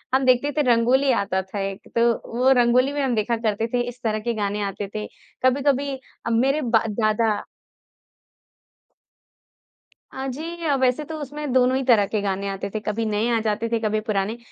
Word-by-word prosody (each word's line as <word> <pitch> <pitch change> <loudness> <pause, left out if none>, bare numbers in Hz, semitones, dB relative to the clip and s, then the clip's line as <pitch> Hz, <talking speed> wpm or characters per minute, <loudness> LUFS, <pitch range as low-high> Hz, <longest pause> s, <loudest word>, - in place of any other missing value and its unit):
हम 265 0 +2
देखते 255 +3 +3
थे - - +4
रंगोली 255 +4 +3
आता 200 -5 0
था 190 +2 -7
एक 195 - -10
तो 235 0 +5 0.3
वो 255 +2 +4
रंगोली 250 +3 +3
में 290 - -1
हम 255 -3 +1
देखा 225 +2 0
करते 225 0 -1
थे 245 - +2
इस 245 +1 -12
तरह 215 -1 0
के 235 +2 -2
गाने 205 -1 -2
आते 200 0 -4
थे 210 0 -3 0.4
कभी-कभी 275 +1 +2 0.3
अ, - - -1
मेरे 265 +6 +2
ब 230 -2 +3 0.2
दादा 215 0 +2 2.8
अ, 265 0 -4
जी 320 +2 -2
वैसे 255 +3 +2
तो 320 +1 -6
उसमें 295 0 -5
दोनों 255 0 +4
ही 270 - -1
तरह 220 -5 +5
के 210 +1 -1
गाने 200 0 -2
आते 195 0 -4
थे, 215 - -4
कभी 215 +1 -2
नए 215 +2 0
आ - - +2
जाते 220 +1 -1
थे, 230 - 0
कभी 215 -1 0
पुराने। 210 +1 -1
230 Hz, 185 wpm, -23 LUFS, 215-265 Hz, 2.8 s, तो